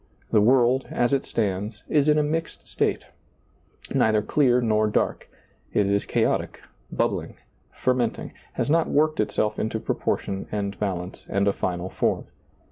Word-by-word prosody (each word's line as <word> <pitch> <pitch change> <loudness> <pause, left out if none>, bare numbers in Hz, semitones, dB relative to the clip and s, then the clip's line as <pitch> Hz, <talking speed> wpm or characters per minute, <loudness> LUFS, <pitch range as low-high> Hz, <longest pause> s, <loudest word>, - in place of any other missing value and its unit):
The 105 - +5
world, 125 +3 +4
as 120 +2 +1
it 135 - 0
stands, 105 0 -2
is 150 -1 +3
in 150 - +4
a 150 - +3
mixed 160 +2 -3
state - - -1 0.5
— - - -16
neither 110 -1 +3
clear 125 -1 +3
nor 110 -3 +2
dark 105 - -1 0.2
— - - -35
it 105 - +4
is 100 +1 +1
chaotic, - - 0 0.3
bubbling^, - - -1 0.4
fermenting, 125 -3 -1 0.2
has - - -1
not 160 +2 +2
worked 155 +1 +2
itself 105 0 0
into 110 +1 -1
proportion 95 -2 -2
and 100 -1 -3
balance 90 -3 -4
and 100 +1 +1
a 100 - +3
final 90 0 -3
form. - - 0
110 Hz, 155 wpm, -25 LUFS, 100-130 Hz, 0.5 s, The